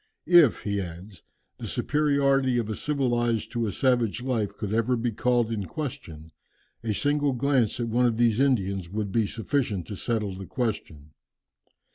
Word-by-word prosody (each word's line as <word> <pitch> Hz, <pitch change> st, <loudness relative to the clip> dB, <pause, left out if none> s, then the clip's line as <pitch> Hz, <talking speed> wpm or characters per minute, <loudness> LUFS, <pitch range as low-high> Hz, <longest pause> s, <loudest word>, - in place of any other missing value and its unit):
"If," 170 Hz, -6 st, +5 dB
he 100 Hz, -1 st, -1 dB
adds, 90 Hz, +1 st, -9 dB, 0.4 s
"the -, -, -5 dB
superiority 140 Hz, -3 st, +1 dB
of 110 Hz, -2 st, -1 dB
a -, -, -2 dB
civilized 120 Hz, -6 st, 0 dB
to 115 Hz, -2 st, -1 dB
a -, -, -2 dB
savage 120 Hz, +1 st, +1 dB
life 110 Hz, -6 st, -2 dB
could 105 Hz, -1 st, -4 dB
ever 115 Hz, +3 st, +2 dB
be 115 Hz, +1 st, -1 dB
called 120 Hz, +1 st, +1 dB
in 105 Hz, -3 st, -2 dB
question, 85 Hz, -, -7 dB, 0.5 s
a 115 Hz, -, -1 dB
single 145 Hz, +5 st, +1 dB
glance 125 Hz, -3 st, +1 dB
at 120 Hz, -, -1 dB
one 120 Hz, +2 st, +2 dB
of 115 Hz, -2 st, -1 dB
these 115 Hz, -1 st, +3 dB
Indians 100 Hz, -10 st, +1 dB
would 105 Hz, 0 st, -3 dB
be 110 Hz, -1 st, +1 dB
sufficient 110 Hz, -, -2 dB
to 105 Hz, -, -7 dB
settle 105 Hz, -1 st, -2 dB
the 95 Hz, 0 st, -8 dB
question. 80 Hz, -, -4 dB
115 Hz, 165 wpm, -26 LUFS, 100-130 Hz, 0.5 s, If